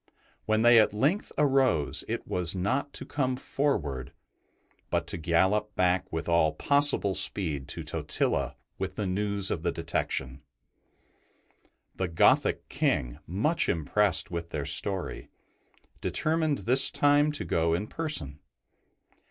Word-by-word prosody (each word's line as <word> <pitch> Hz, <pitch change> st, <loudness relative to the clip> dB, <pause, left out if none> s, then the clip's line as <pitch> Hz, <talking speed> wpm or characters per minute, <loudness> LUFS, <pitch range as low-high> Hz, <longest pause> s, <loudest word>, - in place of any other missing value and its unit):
When 110 Hz, 0 st, +2 dB
they 120 Hz, -1 st, +7 dB
at 105 Hz, -1 st, +2 dB
length 150 Hz, -, 0 dB
arose, 135 Hz, -, +2 dB
it -, -, -4 dB
was 90 Hz, 0 st, -2 dB
not 130 Hz, +10 st, -1 dB
to -, -, -6 dB
come 130 Hz, -3 st, -1 dB
forward, 80 Hz, -, -2 dB, 0.8 s
but -, -, -1 dB
to -, -, -3 dB
gallop 95 Hz, +6 st, +1 dB
back 90 Hz, 0 st, 0 dB
with 80 Hz, +1 st, -4 dB
all 85 Hz, -2 st, +2 dB
possible 140 Hz, -, +2 dB
speed 80 Hz, -7 st, +2 dB
to -, -, -5 dB
Totila 70 Hz, +1 st, -1 dB, 0.2 s
with -, -, -4 dB
the 105 Hz, -, -3 dB
news 100 Hz, +1 st, -2 dB
of 80 Hz, -, -2 dB
the 85 Hz, 0 st, -1 dB
detection. 70 Hz, -5 st, -3 dB, 1.5 s
The 95 Hz, -, -2 dB
Gothic 85 Hz, -1 st, +2 dB
King, -, -, -1 dB
much 110 Hz, -, 0 dB
impressed 80 Hz, +1 st, +1 dB
with 85 Hz, -1 st, -5 dB
their 75 Hz, -2 st, -4 dB
story, 95 Hz, +6 st, 0 dB, 0.7 s
determined 155 Hz, -2 st, 0 dB
this 130 Hz, +3 st, +6 dB
time 145 Hz, +1 st, +3 dB
to -, -, -4 dB
go 80 Hz, 0 st, +1 dB
in 100 Hz, +5 st, -3 dB
person. 110 Hz, -, -1 dB
95 Hz, 130 wpm, -27 LUFS, 80-135 Hz, 1.5 s, they